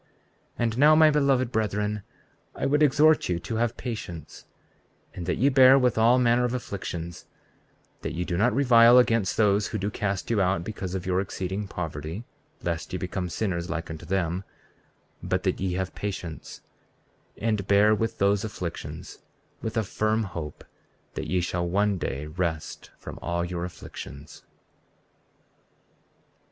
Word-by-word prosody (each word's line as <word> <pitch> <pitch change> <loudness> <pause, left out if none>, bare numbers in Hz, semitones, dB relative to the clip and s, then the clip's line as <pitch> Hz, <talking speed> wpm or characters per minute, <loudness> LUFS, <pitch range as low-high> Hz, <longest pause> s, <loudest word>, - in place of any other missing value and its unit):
34:40 - - -37 0.5
And 115 -1 0
now 150 +2 +7
my 155 0 +6
beloved 135 -4 +2
brethren, 105 -1 -1 0.5
I - - -2
would 150 +2 +2
exhort 150 0 +4
you 90 - +1
to 110 +6 -4
have 115 0 0
patience, 105 -9 -7 0.7
and 90 -1 -7
that 90 - 0
ye 130 - +3
bear 130 0 +7
with 125 -3 +2
all 115 +3 +5
manner 120 -1 +3
of 125 0 0
afflictions; 85 -7 -6 0.7
that 80 - -4
ye 90 - -1
do 90 - -2
not 110 +7 +3
revile 120 -3 +6
against 115 -6 +3
those 105 -1 +3
who 110 - -3
do 100 +1 -2
cast 100 0 -2
you 110 -3 +2
out 90 -2 +1
because 95 -2 -5
of 95 - -4
your 90 0 +1
exceeding 95 +1 -4
poverty, 80 +2 -5 0.4
lest 85 -3 -3
ye 90 - -2
become 90 0 -3
sinners 85 -3 -2
like 85 -1 -4
unto 80 0 -8
them; 90 +1 -1 0.8
34:41 - - -6
But - - 0
that - - 0
ye 95 -2 -1
have 95 0 -3
patience, 95 -5 -6 0.8
and 105 -3 -1
bear 105 +2 +5
with 115 +1 -1
those 100 0 +2
afflictions, 90 -6 -6 0.4
with 110 +1 -4
a 110 - +2
firm 110 +2 0
hope 85 -6 -6 0.5
that - - -5
ye 90 -1 +1
shall 85 0 -2
one 100 +1 +1
day 70 -1 -3
rest 80 0 -4
from - - -9
all 85 0 -1
your 85 0 -3
afflictions. 75 -4 -10
100 Hz, 160 wpm, -26 LUFS, 90-115 Hz, 0.8 s, now